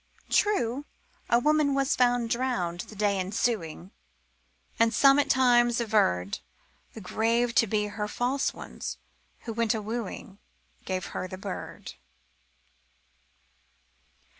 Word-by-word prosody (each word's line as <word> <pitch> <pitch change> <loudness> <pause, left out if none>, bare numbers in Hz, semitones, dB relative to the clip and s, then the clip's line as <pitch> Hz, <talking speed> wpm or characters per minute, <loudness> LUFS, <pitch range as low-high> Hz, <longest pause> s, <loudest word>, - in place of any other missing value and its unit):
True, 285 - +1 0.4
a 235 - +5
woman 295 +2 +2
was 275 0 +1
found 245 -2 +2
drowned 235 -9 -1
the 215 - -8
day 200 -1 +1
ensuing, 190 -3 -2 0.9
And 230 0 +3
some 275 0 +6
at 290 - +1
times 240 -2 +4
averred 100 - +1 0.5
The 220 - -9
grave 230 +5 0
to 230 - +4
be 210 0 0
her 210 0 -4
false 250 +5 0
one's, - - -7 0.4
who 230 - -6
when 230 +1 0
wooing 215 -2 -4 0.5
Gave 185 -1 -2
her - - -3
the 185 - -8
bird. 195 0 -7
230 Hz, 115 wpm, -27 LUFS, 205-245 Hz, 0.9 s, some